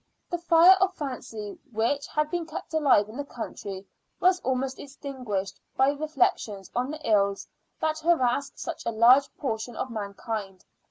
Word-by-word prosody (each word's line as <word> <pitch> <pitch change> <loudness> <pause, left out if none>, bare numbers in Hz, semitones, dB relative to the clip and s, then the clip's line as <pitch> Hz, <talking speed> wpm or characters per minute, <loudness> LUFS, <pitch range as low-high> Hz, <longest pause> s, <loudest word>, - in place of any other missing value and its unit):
The 345 - -1
fire 340 +2 +7
of 380 -1 +2
fancy, 245 -7 -6
which 235 +6 0
had 300 0 -1
been 345 -2 -2
kept 320 - -7
alive 280 -10 +4
in 220 +4 -10
the 285 - -2
country, 200 -7 -7 0.3
was 365 0 +4
almost 260 -2 -2
extinguished 255 -9 -5 0.2
by 265 +1 +5
reflections 270 -9 -1
on 250 +2 0
the 305 -1 -6
ills 200 -2 +2 0.3
that 315 0 0
harass 280 -5 +2
such - - -6
a - - +1
large 245 +5 +6
portion 230 -2 -3
of 255 - -4
mankind. 200 -2 -5
260 Hz, 155 wpm, -27 LUFS, 220-305 Hz, 0.3 s, fire